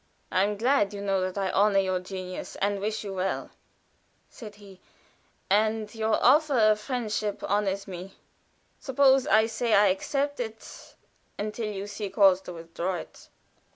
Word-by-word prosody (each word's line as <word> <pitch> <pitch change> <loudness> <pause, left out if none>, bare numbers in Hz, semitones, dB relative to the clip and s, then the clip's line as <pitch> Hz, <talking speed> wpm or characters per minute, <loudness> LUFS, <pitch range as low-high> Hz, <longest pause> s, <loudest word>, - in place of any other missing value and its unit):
"I 185 - +3
am 205 +1 -1
glad, 225 -3 +2
you 200 - -6
know, 195 -1 0
that 185 +1 -3
I 195 -1 -1
honor 205 0 +3
your 190 -1 +1
genius, 185 0 -7
and 200 0 -1
wish 215 +2 -3
you 200 -2 -5
well," 190 0 -3 0.8
said 210 -3 -11
he, 200 -2 -15 0.7
"and 215 +2 +1
your 220 -1 +1
offer 290 +1 +5
of 215 -2 +4
friendship 215 -4 -3
honors 200 -1 -1
me. 185 +1 -8 0.6
Suppose 265 -1 +3
I 220 +1 +5
say 225 0 0
I 200 0 +5
accept 280 +9 -1
it 225 -2 -8 0.4
until 215 +2 -3
you 195 -1 -5
see 205 0 -5
cause 190 -2 +4
to 180 - -9
withdraw 170 +2 -4
it." 175 - -10
205 Hz, 155 wpm, -27 LUFS, 195-220 Hz, 0.8 s, offer